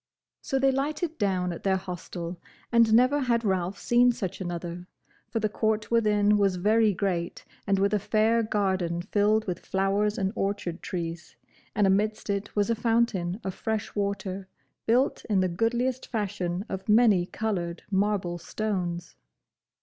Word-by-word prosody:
So 270 - -1
they 270 0 +3
lighted 305 +4 -2
down 185 -4 0
at 170 - -8
their 190 -1 +2
hostel, 180 -2 -6 0.3
and 230 -2 +5
never 255 +6 +5
had 235 -4 +1
Ralph 190 -1 0
seen 245 +1 +4
such 190 -5 -5
another, 175 0 -5 0.4
for 225 - -1
the 215 - +1
court 215 +1 -1
within 210 -2 +3
was 195 -2 +2
very 215 +4 +3
great 180 -3 -2 0.2
and 195 0 +3
with 200 +1 +2
a 210 - +3
fair 220 +3 +2
garden 190 -5 0
filled 210 +2 +2
with 180 -2 -3
flowers 200 +2 0
and 195 +1 -1
orchard 195 -4 -2
trees, 170 -1 -5 0.4
and 205 -1 +3
amidst 210 +2 +1
it 200 +1 -3
was 205 +1 +2
a - - +2
fountain 225 -5 +1
of 190 - -3
fresh 220 +1 -3
water, 195 -2 -3 0.4
built 250 +5 +2
in 205 -4 +1
the 185 - +2
goodliest 240 +8 -1
fashion 195 -4 -2
of 190 +2 -6
many 210 -5 +5
coloured 180 -7 -3
marble 190 -3 0
stones. 175 -2 -3
200 Hz, 155 wpm, -27 LUFS, 185-220 Hz, 0.4 s, and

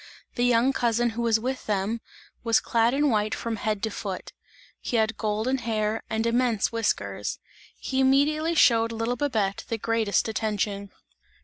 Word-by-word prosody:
The 240 - -1
young 245 +2 +3
cousin 240 -1 +1
who 230 +1 -4
was 230 -2 +2
with 255 +3 -4
them, 210 +2 -1 0.4
was 230 -1 +3
clad 230 +2 +1
in 290 -1 +2
white 215 -1 +1
from 230 -1 -3
head 215 -1 -2
to 220 - 0
foot; 195 -2 -6 0.5
he 240 - -2
had 220 0 +1
golden 220 +5 -1
hair 220 -2 -1
and 220 0 -1
immense 235 -2 +1
whiskers; 230 -2 -2 0.4
he 265 - -2
immediately 300 +5 +3
showed 230 -6 +4
little 230 +2 -1
Babette 220 -9 -1
the 230 - -2
greatest 225 -1 +1
attention. 205 -2 -2
230 Hz, 155 wpm, -26 LUFS, 215-245 Hz, 0.5 s, showed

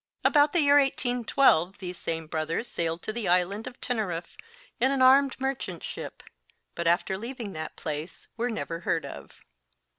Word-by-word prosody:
About 290 -1 +5
the 345 - +3
year 285 0 +6
1812 245 - +2
these 180 -1 -6
same 165 -1 -3
brothers 160 +8 -2
sailed 165 0 -2
to 215 - -4
the 235 -3 -3
island 180 +4 +1
of 250 - -9
Teneriffe 185 -8 -3 0.4
in 255 +3 +3
an 275 - 0
armed 265 +1 +5
merchant 270 0 -3
ship, - - -7 0.5
but 170 0 -2
after 175 +2 +2
leaving 235 -3 -6
that 155 -1 -6
place 155 +2 -6
were 240 +2 -1
never 170 -7 -4
heard 170 - -1
of. - - -10
210 Hz, 160 wpm, -27 LUFS, 170-260 Hz, 0.5 s, year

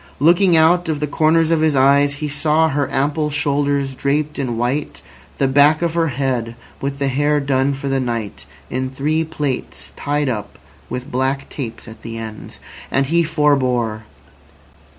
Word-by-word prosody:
Looking 175 +4 +4
out 165 +2 +4
of 155 -2 -1
the 150 - 0
corners 160 +2 +2
of 165 -2 +2
his 155 -2 +2
eyes, 140 +2 +4
he 150 +1 -4
saw 155 +2 +2
her 145 -1 -1
ample 150 +3 0
shoulders 145 -1 0
draped 145 +3 -1
in 125 -4 -2
white, 125 +5 -2 0.3
the 135 - +2
back 145 +4 +4
of 170 -1 0
her 165 -1 +1
head, 125 -4 -2 0.3
with 140 0 -3
the 140 -1 -1
hair 145 +3 +1
done 140 0 +1
for 140 +1 -6
the 135 0 +1
night 115 - -4 0.2
in 130 +1 -2
three 150 +4 0
plaits 145 -5 -4
tied 145 0 -1
up 105 -5 -4 0.3
with 125 +1 -5
black 135 +2 -1
tapes 120 -5 -7
at 110 0 -12
the 115 0 -7
ends. 110 -1 -8 0.3
And 135 +1 +1
he 170 +5 +2
forbore. 130 -8 +1
140 Hz, 170 wpm, -19 LUFS, 130-150 Hz, 0.3 s, Looking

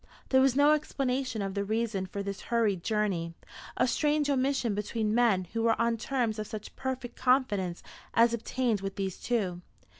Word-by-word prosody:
There 260 -1 +5
was 265 -1 +3
no 290 +2 +5
explanation 265 -6 -1
of 195 -1 -3
the 200 0 -1
reason 215 -2 -1
for 200 +2 -5
this 200 0 -5
hurried 220 -6 +2
journey, 195 -7 -1 0.4
a - - +3
strange 295 +2 +1
omission 265 -4 +1
between 210 +1 -1
men 225 -6 +3
who 230 - 0
were 225 0 +2
on 235 0 +2
terms 230 -2 -1
of 215 - -4
such 215 -1 -8
perfect 260 -2 -4
confidence 230 -9 +1 0.3
as 230 0 +5
obtained 235 -2 -1
with 195 0 -4
these 195 -2 -3
two. 190 -8 -1
230 Hz, 175 wpm, -29 LUFS, 200-255 Hz, 0.4 s, There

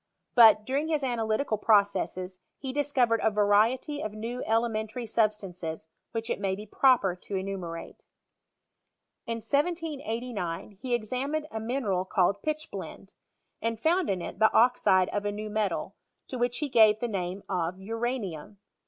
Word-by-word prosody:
But, 220 -3 +7
during 280 +5 -1
his 305 -3 0
analytical 225 -2 0
processes, 195 -3 +1 0.2
he 265 -1 -5
discovered 260 -5 +2
a - - +3
variety 220 +8 +2
of 215 - -4
new 230 +4 -5
elementary 225 +1 0
substances 195 -8 -2 0.2
"which 225 0 -3
it - - -2
may 195 -1 0
be 210 +2 -8
proper 235 -8 +3
to 195 - -6
enumerate. 190 -3 -5 1.2
In 230 - -1
1789 250 - -2
he 250 -2 0
examined 260 +7 -2
a 220 - -3
mineral 220 -5 -1
called 190 +1 +1
pechblendey 310 +1 -5 0.5
and 230 -1 -2
found 345 +6 +2
in 185 -3 -1
it - - -7
the 220 - +5
oxide 225 -6 +4
of 205 - -2
a 205 - -1
hew 210 +1 -5
metal, 215 -1 -1 0.4
to 255 - -5
which 245 0 0
he 300 - -2
gave 220 -4 +5
the 240 - -1
name 190 -2 -3
of 180 -1 -2
uranium. 215 -4 -4
220 Hz, 145 wpm, -28 LUFS, 200-250 Hz, 1.2 s, But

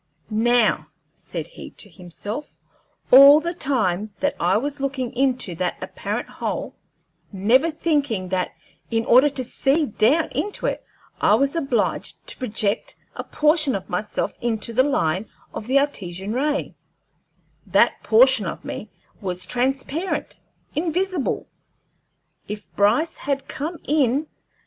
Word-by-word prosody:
"Now," 230 +1 +2 0.3
said - - -6
he - - -11
to - - -8
himself, 200 - -8 0.5
"all 275 +3 +10
the 340 +2 -3
time 215 - 0
that 285 - 0
I 180 +4 +3
was 285 +5 -3
looking 265 -2 -2
into 255 -7 +1
that 175 +1 -2
apparent - - -4
hole, - - -4 0.6
never 225 - +3
thinking 285 - -1
that 185 -1 0 0.4
in 225 -1 0
order 260 +5 +6
to 265 -2 -3
see 275 +5 +1
down 270 +7 +2
into 415 - -3
it - - -1 0.4
I - - +5
was 275 +3 +1
obliged 275 -9 -1
to - - -2
project 215 -4 -1 0.2
a - - -4
portion 305 -4 +2
of 195 - -6
myself 210 +4 -2
into 230 -1 -1
the 255 - +4
line 205 - 0 0.3
of 215 - -6
the 265 +2 +3
Artesian 195 -8 -1
ray, 285 +3 -1 0.9
that - - +3
portion 235 -2 +5
of - - -6
me 215 - -6 0.3
was 185 -2 -3
transparent, 270 +7 -2 0.3
invisible. 345 0 -1 1.0
If 210 0 -8
Bryce 225 +11 +2
had 275 -1 -2
come 320 +5 -4
in! 285 -1 +2
255 Hz, 130 wpm, -23 LUFS, 210-290 Hz, 1.0 s, all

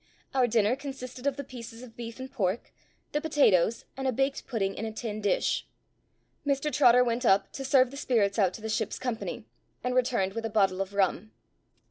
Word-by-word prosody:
Our 260 -2 +3
dinner 220 0 +3
consisted 270 -2 -6
of 280 -1 0
the 280 - -4
pieces 240 -2 -9
of 235 -3 -12
beef 230 0 -7
and 260 0 -7
pork, 205 -4 -2 0.4
the 295 - 0
potatoes, 230 - +3
and 270 0 -2
a - - +3
baked 270 +3 -1
pudding 200 -6 -1
in - - -6
a 220 - -3
tin 215 -1 -5
dish. 205 - +1 0.8
Mr 285 +1 0
Trotter 250 -3 +6
went 240 +1 -1
up 195 -4 +3
to 270 - -5
serve 260 -1 +4
the 275 - -8
spirits 220 -6 +1
out 190 -3 +3
to - - -10
the 220 - -4
ship's 220 -1 -1
company, 245 -3 -4 0.4
and 250 - 0
returned 240 -7 +1
with 230 - -4
a 225 - -2
bottle 195 -3 +2
of 195 +1 -4
rum. 200 +2 0
235 Hz, 200 wpm, -28 LUFS, 215-260 Hz, 0.8 s, Trotter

